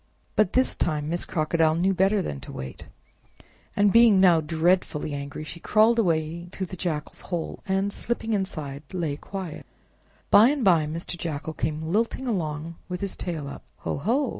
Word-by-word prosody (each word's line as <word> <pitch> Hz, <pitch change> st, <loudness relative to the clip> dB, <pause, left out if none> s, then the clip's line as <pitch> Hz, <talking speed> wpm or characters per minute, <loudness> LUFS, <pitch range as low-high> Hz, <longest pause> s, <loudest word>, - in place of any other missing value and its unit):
But 215 Hz, -4 st, +3 dB
this 255 Hz, +1 st, +2 dB
time 150 Hz, -3 st, -1 dB
Miss 175 Hz, +1 st, -1 dB
Crocodile 160 Hz, 0 st, +1 dB
knew 185 Hz, +3 st, +2 dB
better 195 Hz, +2 st, +2 dB
than 70 Hz, -, -4 dB
to -, -, -10 dB
wait, 65 Hz, 0 st, -7 dB, 0.9 s
and 205 Hz, -1 st, +4 dB
being 230 Hz, -4 st, +7 dB
now 175 Hz, -4 st, +6 dB
dreadfully 160 Hz, -1 st, +1 dB
angry, 140 Hz, +2 st, -5 dB
she 170 Hz, +2 st, -8 dB
crawled 220 Hz, +5 st, +4 dB
away 165 Hz, -3 st, 0 dB
to 190 Hz, -, -3 dB
the 185 Hz, -, -8 dB
Jackal's 160 Hz, -4 st, -3 dB
hole, 175 Hz, -3 st, -4 dB
and, 195 Hz, +1 st, 0 dB
slipping 225 Hz, -1 st, -2 dB
inside, 155 Hz, -8 st, -3 dB
lay 165 Hz, -6 st, -1 dB
quiet. 180 Hz, 0 st, -7 dB, 0.6 s
By 220 Hz, +4 st, +8 dB
and 280 Hz, -5 st, 0 dB
by 165 Hz, -5 st, +5 dB
Mr. 165 Hz, +3 st, -4 dB
Jackal 160 Hz, -1 st, -4 dB
came 155 Hz, +2 st, -2 dB
lilting 225 Hz, +10 st, 0 dB
along 165 Hz, -6 st, -2 dB
with 180 Hz, 0 st, -4 dB
his 200 Hz, -1 st, -3 dB
tail 160 Hz, -5 st, -4 dB
up. 140 Hz, -, -8 dB, 0.2 s
"Ho! -, -, -2 dB
ho! 240 Hz, -, +1 dB
175 Hz, 170 wpm, -26 LUFS, 155-195 Hz, 0.9 s, By